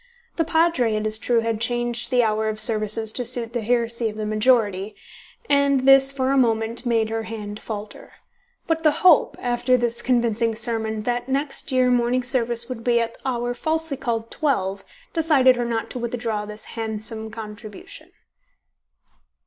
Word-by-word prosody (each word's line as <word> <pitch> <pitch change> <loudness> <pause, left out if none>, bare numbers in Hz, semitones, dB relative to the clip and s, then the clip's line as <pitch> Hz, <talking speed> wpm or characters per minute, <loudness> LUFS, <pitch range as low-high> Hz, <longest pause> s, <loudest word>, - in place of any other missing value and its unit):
The 330 - +1
Padre, 320 -8 +1
it 215 0 -2
is 215 0 0
true, 235 0 +1
had 225 -1 -2
changed 240 0 -1
the 250 -2 +3
hour 220 0 0
of 215 0 +1
services 215 0 +3
to 250 - -3
suit 240 -1 0
the 240 - -2
heresy 235 0 0
of 210 - -9
the 215 - -3
majority, 215 -3 +1 0.5
and 280 -3 +3
this 270 0 +6
for 265 -1 -1
a 275 - +2
moment 230 0 0
made 225 -2 +1
her 225 0 -2
hand 210 -2 -7
falter. 210 -1 -8 0.5
But 325 0 -1
the 315 - +5 0.2
hope, 350 -4 +5
after 245 +1 +1
this 240 -1 -1
convincing 235 -2 +1
sermon, 220 -2 -2
that 245 +2 -2
next 275 +2 -3
year 255 -1 +3
morning 245 +1 +1
service 240 -2 +1
would 250 -3 -7
be 235 -1 +2
at 230 0 -2
the 265 - -4
hour 245 -1 -2
falsely 315 +3 -2
called 230 -4 -3
twelve 195 -10 -1 0.3
decided 300 -6 +4
her 240 0 -2
not 230 -1 -3
to 250 - -5
withdraw 230 -3 -3
this 210 0 -9
handsome 220 0 -4
contribution. 220 - -10
235 Hz, 170 wpm, -22 LUFS, 220-255 Hz, 0.5 s, this